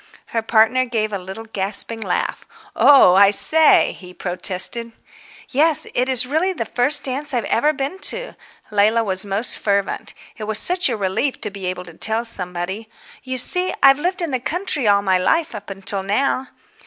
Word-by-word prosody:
Her 225 - 0
partner 225 +3 +2
gave 220 -3 -2
a 200 - -3
little 190 +5 -9
gasping 215 +2 0
laugh. 190 -4 -3 0.3
"Oh, 265 -7 +6
I 195 +1 +6
say," 310 +10 +3
he 180 -1 -14
protested. 190 +6 0 0.6
"Yes, 305 +3 +2
it 250 +2 0
is 255 -1 +6
really 320 +8 -1
the 230 - -4
first 270 +6 +1
dance 275 +2 -1
I've 240 - -1
ever 295 +6 +1
been 285 +6 -5
to." - - -5 0.4
Leila 215 +3 +2
was 190 -1 0
most 200 +5 +1
fervent. 200 -1 -2 0.2
It 215 - -6
was 215 0 0
such 360 +2 +2
a 235 - -3
relief 205 +8 -2
to 210 - -4
be 195 -2 -7
able 180 0 -5
to 170 - -13
tell 220 +7 0
somebody. 190 0 -5 0.3
"You 260 -1 -5
see, 360 +9 +1
I've 275 +1 +6
lived 360 +3 -2
in 330 - -3
the 255 - -1
country 305 - -3
all 200 0 +3
my 190 -2 +1
life 325 - 0
up 205 -2 -9 0.2
till 200 -1 -1
now...." 255 +6 -1
225 Hz, 180 wpm, -19 LUFS, 200-275 Hz, 0.6 s, Oh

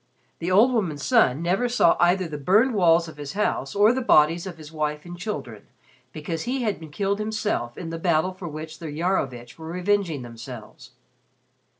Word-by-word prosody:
The 170 - -3
old 220 +8 +5
woman's 165 - -1
son 165 - +3
never 195 +8 +1
saw 235 -8 +4
either 180 +1 +3
the 150 -2 -6
burned 210 - +3
walls 170 -4 +4
of 160 - -11
his 145 +1 -6
house 200 -8 -1
or 210 +3 +5
the 260 - -1
bodies 165 -3 +4
of 175 -3 -7
his 155 -1 -11
wife 150 0 -3
and 175 0 -8
children, 140 - -6 0.4
because 160 +2 -5
he 255 +1 -1
had 215 -3 -1
been 160 -1 -10
killed 200 +6 -1
himself 215 - -2
in 165 -3 -6
the 165 - -5
battle 170 +2 +1
for 185 -1 -8
which 155 0 -8
the 165 - -6
Iarovitch 145 -6 -2
were 160 - -8
revenging 180 -4 0
themselves. 115 -1 -10
170 Hz, 190 wpm, -24 LUFS, 150-200 Hz, 0.4 s, old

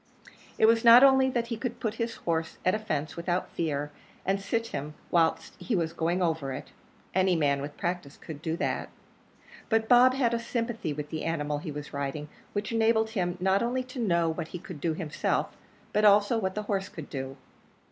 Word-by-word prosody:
It - - +5
was 225 +1 +4
not 235 +2 +9
only 265 -1 +6
that 235 -2 -1
he 230 - -2
could 240 +1 -4
put 220 -2 -1
his 230 0 -2
horse 165 -1 -2
at 185 - +4
a 215 - 0
fence 155 -8 -3
without 175 +1 -2
fear, 150 -2 -2 0.3
and 195 +1 +1
sit 230 +3 -1
him 150 +2 -4 0.2
whilst 165 -2 +2
he 235 - -1
was 165 -2 -1
going 170 +2 0
over 160 -5 -1
it - - -8 0.4
any 185 -1 +3
man 140 -3 +1
with 145 +1 -7
practice 175 -5 -3
could 155 -3 -9
do 160 0 -2
that; - - -2 0.8
but 225 0 +2
Bob 250 +2 +6
had 245 -3 +2
a 235 - +1
sympathy 230 -6 -3
with 150 0 -5
the 155 - -3
animal 150 -3 -1
he 150 - -6
was 150 0 -7
riding, 140 +1 -3 0.2
which 205 +2 -2
enabled 225 -1 +2
him 180 -4 -1
not 190 +2 +2
only 250 +2 0
to 255 +1 -9
know 170 -7 +2
what 160 0 -2
he 180 - -6
could 170 -3 -10
do 165 -2 0
himself, 155 -3 -1 0.4
but 210 - +2
also 210 +2 +5
what 190 -3 -2
the 210 - -2
horse 195 -2 -2
could 160 -3 -8
do. 135 0 -5
180 Hz, 205 wpm, -28 LUFS, 155-225 Hz, 0.8 s, not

